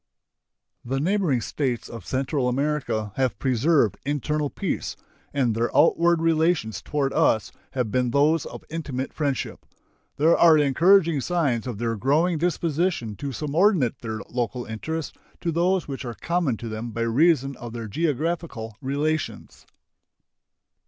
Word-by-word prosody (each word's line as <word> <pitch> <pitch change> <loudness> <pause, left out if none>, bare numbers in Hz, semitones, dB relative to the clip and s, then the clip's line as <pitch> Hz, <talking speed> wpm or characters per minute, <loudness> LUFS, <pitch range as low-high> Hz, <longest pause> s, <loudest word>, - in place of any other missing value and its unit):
The 135 +3 -2
neighboring 170 - +1
States 125 -1 -2
of 115 -6 -9
Central 130 0 0
America 125 -6 -1
have 130 -6 +1
preserved 130 - +2
internal 145 +1 -1
peace, - - -3 0.4
and 130 -5 +1
their 115 +2 0
outward 170 +2 +4
relations 160 - +1
toward 140 -2 -1
us 110 - +2 0.2
have 125 -5 -1
been 125 +1 +1
those 145 +5 +2
of - - -9
intimate 140 -5 -4
friendship. 140 -4 -2 0.5
There 160 +3 +5
are 165 -2 +6
encouraging 160 +2 +4
signs 140 -9 0
of 120 -5 -4
their 115 +1 -1
growing 155 - +2
disposition 165 - 0
to 140 -1 -4
subordinate 150 - +1
their 110 -2 -5
local 120 0 -3
interests 155 +8 -4 0.3
to 170 - -1
those 175 +2 +1
which 140 -1 -5
are 120 -2 -5
common 170 -8 0
to 115 - -7
them 110 +2 -5
by 115 +1 -4
reason 135 +3 +3
of 120 -1 -8
their 115 -2 -5
geographical 155 - -2
relations. 145 +4 -3
140 Hz, 140 wpm, -24 LUFS, 120-160 Hz, 0.5 s, are